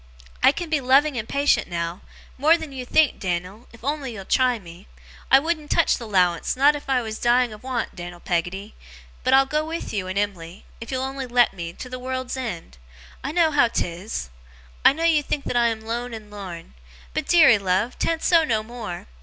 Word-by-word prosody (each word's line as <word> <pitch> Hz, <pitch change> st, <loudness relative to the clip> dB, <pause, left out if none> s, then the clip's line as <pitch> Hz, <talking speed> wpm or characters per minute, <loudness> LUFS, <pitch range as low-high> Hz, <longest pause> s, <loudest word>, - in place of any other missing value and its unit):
I -, -, +7 dB
can 335 Hz, +2 st, -6 dB
be 305 Hz, -3 st, +2 dB
loving 270 Hz, +3 st, +4 dB
and 225 Hz, -2 st, -4 dB
patient 280 Hz, -6 st, +2 dB
now 170 Hz, +1 st, -4 dB, 0.3 s
more 310 Hz, +5 st, +4 dB
than 315 Hz, -4 st, -8 dB
you 255 Hz, -2 st, -7 dB
think, 310 Hz, +1 st, +3 dB
Dan'l, 185 Hz, +5 st, -4 dB
if 230 Hz, 0 st, -17 dB
you'll 280 Hz, -, +1 dB
on'y 270 Hz, -7 st, -6 dB
try 255 Hz, +1 st, +2 dB
me. 175 Hz, -1 st, -13 dB, 0.4 s
I 265 Hz, -, +8 dB
wouldn't 310 Hz, +1 st, -2 dB
touch -, -, +2 dB
the 230 Hz, -, -7 dB
'lowance, 180 Hz, -4 st, +1 dB
not 285 Hz, +3 st, +5 dB
if 285 Hz, -1 st, -8 dB
I 255 Hz, -2 st, +2 dB
was 220 Hz, -1 st, -5 dB
dying 240 Hz, -1 st, +2 dB
of 210 Hz, -, -12 dB
want, 255 Hz, -2 st, -3 dB
Dan'l 175 Hz, -1 st, -8 dB
Peggotty; 180 Hz, +4 st, -3 dB, 0.5 s
but 255 Hz, +1 st, +4 dB
I'll 270 Hz, 0 st, +6 dB
go 300 Hz, +3 st, -1 dB
with 325 Hz, -3 st, -5 dB
you 195 Hz, -3 st, -2 dB
and 185 Hz, +1 st, -4 dB
Em'ly, 190 Hz, -3 st, -3 dB
if 230 Hz, -, -9 dB
you'll 260 Hz, -1 st, -2 dB
on'y 265 Hz, 0 st, -4 dB
let 245 Hz, -2 st, +3 dB
me, 170 Hz, -3 st, -6 dB
to 255 Hz, -, -8 dB
the 255 Hz, 0 st, -7 dB
world's 255 Hz, 0 st, -4 dB
end! 180 Hz, -, -6 dB, 0.4 s
I 275 Hz, -, -3 dB
know 325 Hz, -1 st, +3 dB
how 290 Hz, -5 st, +4 dB
'tis; 175 Hz, -, -4 dB, 0.5 s
I -, -, +8 dB
know 320 Hz, +4 st, -4 dB
you 325 Hz, -3 st, +4 dB
think 290 Hz, 0 st, -3 dB
that -, -, -3 dB
I 240 Hz, -1 st, +4 dB
am 225 Hz, -1 st, -2 dB
lone 235 Hz, +2 st, -4 dB
and 215 Hz, -1 st, -11 dB
lorn; 185 Hz, -, -8 dB, 0.4 s
but, -, -, -2 dB
deary 285 Hz, -11 st, +6 dB
love, 195 Hz, +5 st, -1 dB
'tan't 325 Hz, -1 st, -1 dB
so 335 Hz, -2 st, +5 dB
no 220 Hz, -7 st, 0 dB
more! 220 Hz, -6 st, -7 dB
240 Hz, 210 wpm, -23 LUFS, 195-275 Hz, 0.5 s, I